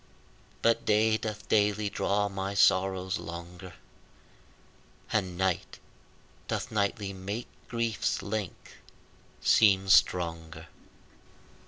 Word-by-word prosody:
But 115 0 +3
day 110 +1 +3
doth 105 -1 -5
daily 105 0 +2
draw 100 0 0
my 95 0 -4
sorrows 95 0 +2
longer, 85 +1 -9 1.4
And 90 -1 -1
night 95 -2 -1 0.7
doth - - -3
nightly 100 -1 -1
make 100 +5 -5 0.2
grief's 115 -3 -1
length 105 -3 -5 0.6
seem 95 -3 +4
stronger. 85 -3 +2
100 Hz, 85 wpm, -29 LUFS, 95-105 Hz, 1.4 s, seem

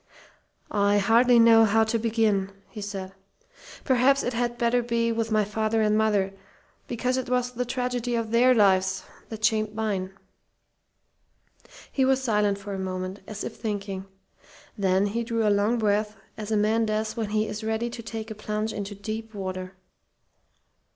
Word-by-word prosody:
"I 205 0 +3
hardly 235 +4 +5
know 230 -1 +7
how 220 +1 +4
to 220 +1 0
begin," 215 -4 +1 0.2
he 215 - -7
said. 195 -2 -6 0.7
"Perhaps 265 +1 +3
it 245 - -2
had 240 0 -1
better 240 +1 +2
be 230 -1 0
with 225 0 -1
my 215 -1 +2
father 220 +1 0
and 210 0 +2
mother, 205 -3 +1 0.5
because 250 +2 -1
it 260 -1 -3
was 250 0 0
the 250 0 -3
tragedy 245 -1 -2
of 230 -1 -2
their 250 +2 +5
lives 190 -3 +3 0.3
that 220 -1 -2
shaped 215 -1 +1
mine." 195 -3 -2 1.7
He 270 - +1
was 265 0 +2
silent 210 -4 +1
for 200 0 -7
a 195 - -4
moment, 185 +1 -4
as 210 -1 -6
if - - -6
thinking. 200 -3 -4 0.7
Then 190 -1 +2
he 230 +3 -1
drew 230 -2 0
a 205 - +4
long 205 +4 +2
breath, 210 -1 0 0.2
as 215 -1 -6
a 220 - +1
man 220 +2 +2
does 215 +1 -1
when 225 -3 -3
he 215 0 +1
is 210 +1 -5
ready 220 +2 -1
to 235 - -7
take 225 -1 -6
a - - -3
plunge 215 +1 -3
into 205 0 -5
deep 220 +2 -6
water. 185 -1 -5
220 Hz, 170 wpm, -26 LUFS, 205-230 Hz, 1.7 s, know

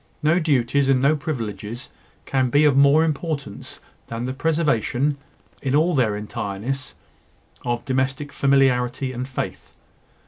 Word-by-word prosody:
No 155 +4 +4
duties 140 -3 +2
and 135 -1 +4
no 140 +4 +3
privileges 120 -5 -5 0.3
can 130 -2 +1
be 145 +4 +4
of 145 -3 +4
more 140 +3 +6
importance 150 - -4 0.3
than 115 +1 -4
the 130 - -3
preservation, 145 -2 0 0.4
in 135 0 0
all 165 +4 +3
their 115 -7 +2
entireness, 105 +5 -4 0.7
of 120 -1 -2
domestic 135 +2 -1
familiarity 130 -2 +2
and 125 +1 -4
faith. 130 - -5
135 Hz, 130 wpm, -22 LUFS, 120-145 Hz, 0.7 s, more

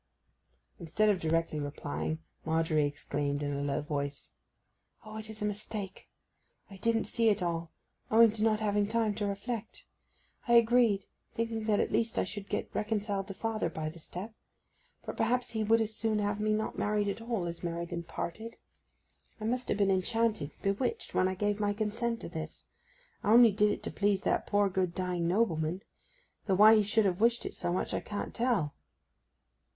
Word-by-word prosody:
Instead 210 +6 +1
of 200 -3 +2
directly 165 -1 0
replying, 145 +2 -3 0.3
Margery 160 -2 +2
exclaimed 145 0 -2
in 145 0 -1
a 140 - -2
low 145 +1 -1
voice: 145 -2 -4 0.7
'O, 215 0 -8
it 220 0 -8
is 215 -1 -6
a - - +1
mistake—I 205 -1 -8
didn't 225 +3 +1
see 230 -1 +2
it 205 -3 +1
all, 170 -1 -2 0.4
owing 225 0 +7
to 215 0 -5
not 215 -1 +2
having 205 -1 +1
time 220 -1 +1
to 205 0 -2
reflect! 215 +3 -5 0.6
I 235 - +3
agreed, 235 -4 +5 0.3
thinking 225 -1 -2
that 210 -2 +2
at - - 0
least 230 -1 0
I - - +3
should 205 -2 -6
get - - -3
reconciled 205 -2 -1
to 195 - -7
father 220 -5 -1
by 155 -1 -4
the 165 +2 -11
step. 185 +7 -7 0.7
But - - -5
perhaps 245 +2 +1
he 220 -2 -1
would 225 +2 +4
as 220 0 -2
soon 220 -1 0
have 205 0 -1
me 215 0 +1
not 215 +1 -1
married 210 0 +1
at 200 +3 -3
all 230 -6 -2
as 170 0 -5
married 170 0 -4
and 170 -1 -4
parted. 225 +9 -5 0.8
I 215 - -5
must 250 +2 -1
ha' - - +1
been 200 -1 +3
enchanted—bewitched—when 200 - 0
I 185 - -2
gave 205 +2 0
my 205 -1 +1
consent 230 +2 -2
to - - -6
this! 160 -2 -7 0.6
I 205 - +2
only 235 -1 +8
did 210 +1 +3
it - - -4
to - - -4
please 200 0 +1
that - - 0
dear 205 -1 +4
good 185 -2 -1
dying 180 -2 -1
nobleman—though 190 - -2
why 215 +3 +8
he 215 - +5
should 210 +1 +2
have 185 0 0
wished 235 +1 +3
it - - -4
so 175 - -2
much 180 - -1
I - - 0
can't 205 -1 -5
tell! 230 - +1
205 Hz, 180 wpm, -31 LUFS, 175-220 Hz, 0.8 s, only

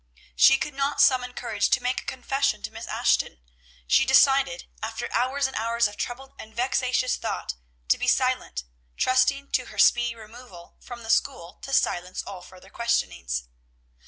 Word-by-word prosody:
She 270 - +6
could 295 +2 -4
not 275 +1 -1
summon 255 -3 +4
courage 220 -4 -1
to 260 - +3
make 250 +1 -1
a - - -20
confession 270 -3 -1
to 220 - -5
Miss 225 +1 -8
Ashton; - - 0 0.5
she - - +4
decided, 265 0 +3
after 225 0 -5
hours 260 +4 +1
and 265 - -3
hours 230 +1 +1
of 205 - -10
troubled 265 +5 -6
and 220 0 -11
vexatious 255 +1 0
thought, - - -4 0.4
to - - +3
be - - -2
silent, 60 0 +1 0.3
trusting 275 +2 +2
to - - 0
her - - -13
speedy 240 -1 +4
removal 220 -5 -13
from 240 -2 -10
the 225 - -1
school 190 -11 -1
to 275 - -8
silence 180 -8 0
all 190 -2 -9
further 185 +1 -16
questionings. 60 - -2
245 Hz, 165 wpm, -25 LUFS, 215-265 Hz, 0.5 s, She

